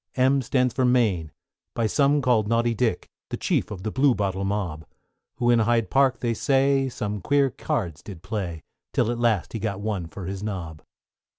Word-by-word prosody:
=M= 135 +1 +3
stands 125 -1 +1
for 130 - 0
Mayne, 110 -11 +2 0.4
by 115 - +1
some 140 +5 +2
called 115 -5 +3
Naughty 115 +1 +2
Dick, 115 -4 -1 0.2
The - - -3
chief - - 0
of 95 -3 -7
the 110 - -2
Bluebottle 105 -8 +1
mob; 95 -6 -2 0.5
Who 120 0 +2
in 120 - +4
Hyde 115 0 +1
Park, 135 -2 +3
they 120 -1 0
say, 135 +2 +2
some 105 -5 -4
queer 140 +4 +2
cards 85 -11 -3
did 95 -5 -10
play, 95 -5 -4 0.3
Till 115 - +2
at 120 - -3
last 115 -6 +1
he 115 - -3
got 100 -2 -3
one 100 -5 -3
for 90 +3 -8
his 95 +1 -5
nob. 90 -7 -5
110 Hz, 185 wpm, -25 LUFS, 95-125 Hz, 0.5 s, in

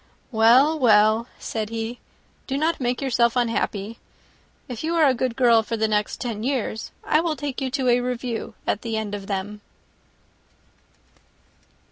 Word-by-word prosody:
"Well, 250 +8 +5
well," 220 -1 +4
said 215 -2 -4
he, 230 +1 -4 0.5
"do 270 - -1
not 320 +3 0
make 245 +2 -1
yourself 235 -3 +2
unhappy. 230 -3 -1 0.7
If 245 0 -6
you 330 +2 -1
are 325 -2 +5
a 270 - +4
good 250 -1 -2
girl 235 -3 +5
for 225 +1 -4
the 220 0 +1
next 210 -1 -1
ten 230 -4 -4
years, 240 -3 -2
I 305 - +2
will 330 -2 -1
take 285 -2 -5
you 265 - -1
to 260 0 -1
a 245 0 +4
review 245 -2 -4
at - - -1
the 225 -2 -3
end 215 -2 -4
of 200 -1 -6
them." 205 +1 -4
235 Hz, 160 wpm, -23 LUFS, 220-260 Hz, 0.7 s, Well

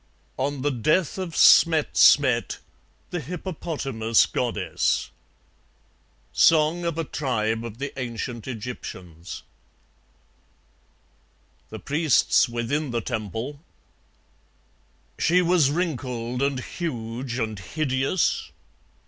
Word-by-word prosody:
On 135 0 -2
the 145 - +1
Death 155 - +1
of 180 -3 -5
Smet 160 -3 +5
Smet, 125 -6 +4 0.5
the 175 - -2
Hippopotamus 145 - -1
Goddess - - -1 1.2
Song 160 +2 +4
of 170 -2 -2
a 165 - 0
tribe 115 -7 -2
of 115 -2 -7
the 140 +2 -5
ancient 120 -1 -5
Egyptians 95 -8 -7 2.3
(The - - -7
Priests 150 -3 +2
within 125 +6 -2
the 120 -1 -1
Temple) 115 - -4 1.6
She 180 +2 +3
was 170 -5 +3
wrinkled 125 -7 -2
and 140 -1 0
huge 120 -5 -5
and 110 -4 -3
hideous? 135 - -1
135 Hz, 90 wpm, -24 LUFS, 115-155 Hz, 2.3 s, Smet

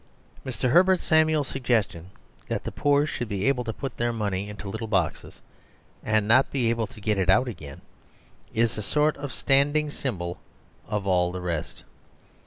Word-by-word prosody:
Mr. 125 0 -2
Herbert 185 +2 +5
Samuel's 155 -2 +2
suggestion 110 -9 -1 0.4
that - - -3
the - - -4
poor 145 0 +2
should 120 -6 -4
be 100 -1 -2
able 130 -3 +2
to 115 - -3
put 135 +2 -6
their 120 0 0
money 100 -3 -2
in 105 - -8
little 110 +3 -5
boxes 95 -7 -2 0.6
and 110 -1 +1
not 125 +4 +5
be 120 -4 +1
able 115 -2 -1
to - - -14
get 105 -1 0
it 95 -1 0
out 125 +7 +4
again 75 - -8 0.7
is 115 -1 0
a - - -2
sort 150 +9 +1
of 140 -1 -6
standing 145 +3 +2
symbol 90 -12 -4 0.5
of 105 -2 -2
all 90 -2 +2
the 90 - -5
rest. 85 -3 -4
115 Hz, 175 wpm, -26 LUFS, 100-135 Hz, 0.7 s, Herbert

